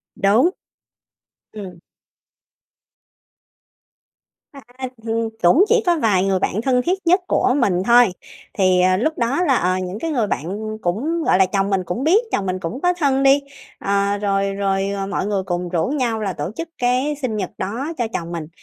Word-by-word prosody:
Đúng. 220 - +3 1.0
Ừm. 190 -5 -9 2.7
À, 280 -3 -12 0.4
hìn 225 0 -1
cũng 255 - +6
chỉ 460 +1 +3
có 350 -2 +3
vài 200 -5 +2
người 195 -1 +1
bạn 200 +3 -1
thân 250 0 +2
thiết 365 +7 -1
nhất 365 +3 +4
của 255 - +2
mình 190 -9 +1
thôi. 235 -4 +5 0.4
Thì, 185 -2 +3
ờ, 185 0 +3
lúc 310 +10 -1
đó 250 +7 0
là, 275 -7 +3
ờ, 185 -3 +1
những 185 +2 -5
cái 325 - -3
người 240 -8 0
bạn 210 +6 -4
cũng, 285 - -1
gọi 185 - +3
là, 190 - +5
chồng 195 +1 -1
mình 195 -2 0
cũng 180 +10 -3
biết, 375 - +4
chồng 195 - -1
mình 185 0 -2
cũng 180 +10 -5
có 360 0 +2
thân 280 -6 +1
đi, 275 +1 +5 0.4
ờ, 200 0 0
rồi 195 -1 0
rồi, 195 0 -1
ờ, 200 -1 -3
mọi 200 - -2
người 200 -2 -1
cùng 175 -1 -3
rủ 170 -2 0
nhau 250 -5 -1
là 200 -3 -2
tổ 150 +2 -4
chức 330 +3 -5
cái 255 +4 0
sinh 245 -5 -2
nhật 195 -4 -3
đó 240 - -4
cho 240 -2 -1
chồng 170 0 -4
mình. 165 -3 -5
210 Hz, 185 wpm, -20 LUFS, 190-265 Hz, 2.7 s, cũng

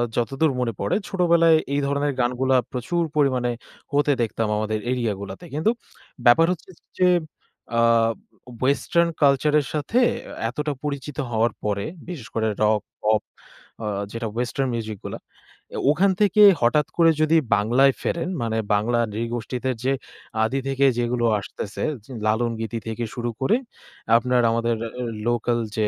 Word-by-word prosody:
যতদূর 135 +6 +1
মনে 115 -3 -1
পড়ে, 100 - 0
ছোটবেলায় 170 -3 +4 0.2
এই 145 - +2
ধরনের 140 +1 0
গানগুলা 125 +2 +1 0.2
প্রচুর 170 +7 -1
পরিমাণে 130 -4 +2 0.4
হতে 145 0 +3
দেখতাম, 115 -1 -1
আমাদের 110 0 -1
এরিয়া 120 -4 0
গুলাতে। 95 - -8
কিন্তু 160 +10 +2 0.5
ব্যাপার 125 +7 +7
হচ্ছে 180 - -6 0.3
যে, 180 - +4 0.7
আ - - +5 0.8
ওয়েসটার্ন 170 +5 +2
কালচার 140 +1 +4
এর 140 - -4
সাথে, 155 +11 0 0.5
এতটা 150 +4 -2
পরিচিত 145 -1 -4
হওয়ার 115 0 +2
পরে, 100 -1 -1 0.2
বিশেষ 150 -10 -7
করে 110 -1 +1 0.2
রক, 105 -1 +3 0.2
পপ 105 0 +3 0.6
আ - - -2 0.2
যেটা 115 +1 -4
ওয়েসটার্ন 125 +2 -1
মিউজিক 110 -2 -4
গুলা। - - -5 0.6
এ - - -3
ওখান 190 +6 +3
থেকে 205 +1 +4 0.2
হঠাৎ 135 +6 +3
করে 165 -1 +6
যদি 160 +1 +4 0.2
বাংলায় 125 +6 +4
ফেরেন, 170 +1 -2
মানে 110 -1 -1 0.2
বাংলা 115 +3 +1
নৃগোষ্ঠীতে 120 +3 -3
যে, 135 +1 +2 0.5
আদি 135 +5 0
থেকে 135 0 +2
যেগুলো 120 0 0
আসতেছে, 100 0 -6 0.2
জ - - -24 0.2
লালন 115 +2 +1
গীতি 115 +1 -3
থেকে 115 +1 -3
শুরু 120 -1 -2
করে 210 - +3 0.6
আপনার 125 +1 +2
আমাদের 115 0 +1 0.5
লোকাল 120 0 +1 0.2
যে, 110 -1 +2
125 Hz, 145 wpm, -23 LUFS, 115-145 Hz, 0.8 s, ব্যাপার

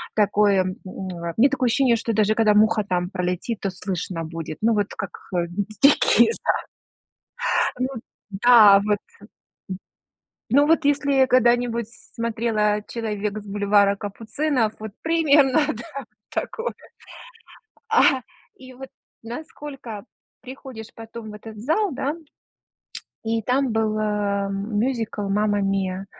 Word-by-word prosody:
такой 205 -1 +3
м, 185 0 0
у 190 0 -7 0.3
меня 260 +5 +5
такое 255 -2 0
ощущение 245 0 +3
что 225 0 -2
даже 215 0 +2
когда 215 -2 +4
муха 215 +1 +3
там 180 -2 -1
пролетит, 180 +4 -3
то 195 - -1
слышно 180 -2 -4
будет. 160 -1 -6
Ну 225 +1 +3
вот 205 -2 +1
как - - -4 0.7
дикие, 285 +9 +5
да. - - 0 1.1
Ну 255 +1 0 0.4
да, 210 -1 +7
вот. 210 -1 +1 1.5
Ну 285 +3 +4
вот, 325 -1 +3
если 280 -2 +3
когда-нибудь 240 -2 +2 0.3
смотрела 220 -2 0
"Человек 215 -2 -3
с 210 - -13
бульвара 200 0 +3
Капуцинов", 220 +4 -2
вот 215 -1 -7
примерно, 310 -4 +3
да, 240 +4 -8 0.2
такое. 460 +1 -3 1.2
А 285 - +4 0.3
и 260 -4 -13
вот, 265 +1 -10 0.3
насколько 245 -3 -8 0.4
приходишь 255 -4 -10
потом 225 -1 -9
в 210 - -10
этот 215 +1 -10
зал, 320 - 0
да 275 +2 -2 1.1
и 225 0 0
там 255 +2 +1
был, 215 -1 0
э, 205 -2 -1
мюзикл 215 +3 -2
"Мамма 205 +1 +1
Мия!". 195 -1 -1
220 Hz, 120 wpm, -23 LUFS, 205-255 Hz, 1.5 s, да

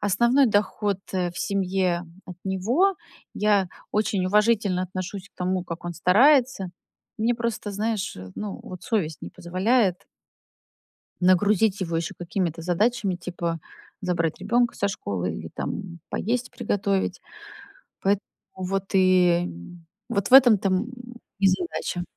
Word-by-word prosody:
основной 235 +7 +4
доход, 205 -2 +1
э, 180 -2 0
в 175 - -9
семье 185 -3 0 0.2
от 180 -3 -9
него. 235 - +2 0.4
Я 205 -3 +2 0.2
очень 205 -3 0
уважительно 205 -2 +2
отношусь 185 +1 -5
к - - -58
тому, 185 0 -1
как 170 -1 -7
он 175 - -3
старается. 235 - +4 0.5
Мне 230 +2 +2
просто, 235 -3 -3
знаешь, 210 - -2
э, 95 0 -9
ну, 210 -2 -5
вот 180 -1 -9
совесть 170 -10 -1
не - - -5
позволяет 185 +2 +1 1.1
нагрузить 195 +2 +3
его 170 -2 -2
ещё 165 - -3
какими-то 170 -1 -2
задачами, 200 +3 +1
типа 170 -1 -4 0.4
забрать 170 -3 -1
ребёнка 235 +4 +1
со 200 - 0
школы 95 - -3
или, 80 0 -7
там, 175 -4 -5
поесть 245 +4 -2
приготовить. 195 -1 -1 0.8
Поэт 195 0 +2 0.4
вот 190 +1 -2
и 180 -2 +4 0.6
вот 200 -1 -1
в - - +6
этом-то, 235 -7 +7
м, 190 +6 0 0.5
и 195 - +3
задача. 185 - -2
190 Hz, 130 wpm, -25 LUFS, 180-210 Hz, 1.1 s, этом-то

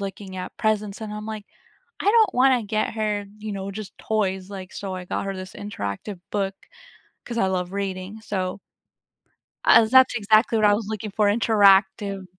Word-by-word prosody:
looking 195 -1 -6
at 180 - -7
presents, 215 -1 -1
and 215 -1 -5
I'm, 210 0 -6
like, 215 -2 -6 0.5
"I - - -6
don't 445 -1 +4
wanna 255 -1 +4
get 215 +1 -1
her, 210 -2 -1
you 215 0 -5
know, 195 0 -5
just 200 0 -8
toys, 195 -3 -2
like" 190 -2 -8
so, 195 -2 -5
I 180 -1 -7
got - - -3
her 195 0 -3
this 185 0 -8
interactive 195 - -6
book 195 -2 -1 0.7
'cause 235 -1 -5
I 195 - +3
love 185 -1 -2
reading, 195 +1 -4
so 195 -3 -3 1.0
Uh, 230 - +7
that's 255 +2 +5
exactly 220 +1 +3
what 215 - +3
I 205 - +6
was 205 0 -2
looking 215 -1 -4
for, 210 +1 +2
interactive 200 -2 +3
205 Hz, 180 wpm, -24 LUFS, 190-215 Hz, 1.0 s, Uh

